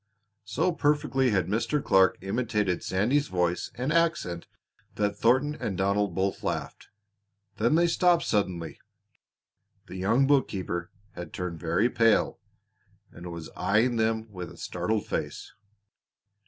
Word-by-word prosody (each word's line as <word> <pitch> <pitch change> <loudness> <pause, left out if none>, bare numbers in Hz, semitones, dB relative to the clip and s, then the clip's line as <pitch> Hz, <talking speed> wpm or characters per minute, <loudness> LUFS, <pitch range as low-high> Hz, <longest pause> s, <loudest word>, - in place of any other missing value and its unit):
'" 105 +1 -52
So 175 +6 +2
perfectly 145 -5 +1
had 95 -6 +1
Mr. 115 - 0
Clark 95 0 +4
imitated 105 -2 -1
Sandy's 125 +10 +1
voice 90 -1 -1
and 130 +6 -1
accent 165 - 0 0.5
that 105 -1 0
Thornton 130 +6 +2
and 100 -10 -4
Donald 100 -1 +1
both 95 +1 -1
laughed. - - -4 0.7
Then 120 +7 +2
they 170 +1 +4
stopped 175 0 +3
suddenly. 90 -6 -2 1.1
The 95 - -9
young 115 +9 +2
bookkeeper 95 -11 0 0.2
had 90 -5 -9
turned 90 -3 -4
very 85 +8 +1
pale 115 -3 +2 0.7
and 85 0 -9
was 85 -1 -8
eying 115 +4 +2
them 110 0 0
with 90 -3 -7
a - - -14
startled 110 -1 -2
face. - - -4
105 Hz, 130 wpm, -27 LUFS, 95-130 Hz, 1.1 s, Clark